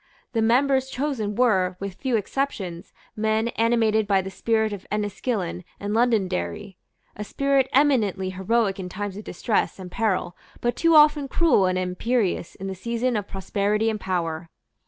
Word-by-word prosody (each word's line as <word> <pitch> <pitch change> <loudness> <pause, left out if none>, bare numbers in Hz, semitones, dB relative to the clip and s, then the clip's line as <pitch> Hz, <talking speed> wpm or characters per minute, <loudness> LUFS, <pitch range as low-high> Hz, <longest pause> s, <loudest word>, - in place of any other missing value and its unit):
The 225 - +1
members 265 +3 +3
chosen 250 -7 -2
were, 190 -7 +2
with 195 -1 -5
few 255 +5 -2
exceptions, 200 -6 -3 0.2
men 220 +1 +1
animated 225 -2 +2
by 195 -2 +2
the 190 - -6
spirit 220 +2 0
of 200 - -8
Enniskillen 205 -3 -2 0.2
and 205 +1 -3
Londonderry, 205 -3 0 0.4
a 210 - -5
spirit 275 +4 +1
eminently 225 -9 +2
heroic 195 +1 0
in 180 -1 -5
times 200 +1 -5
of 210 - -7
distress 205 +4 -1
and 185 -2 -9
peril, 195 -6 -1 0.2
but 240 0 -1
too 330 -1 +3
often 300 -2 +6
cruel 285 - +3
and 185 0 0
imperious 185 +1 -1
in 190 - -8
the 195 - -3
season 235 +6 -2
of 205 -2 -2
prosperity 205 +3 0
and 215 - -4
power. 170 -3 -3
210 Hz, 155 wpm, -24 LUFS, 190-240 Hz, 0.4 s, often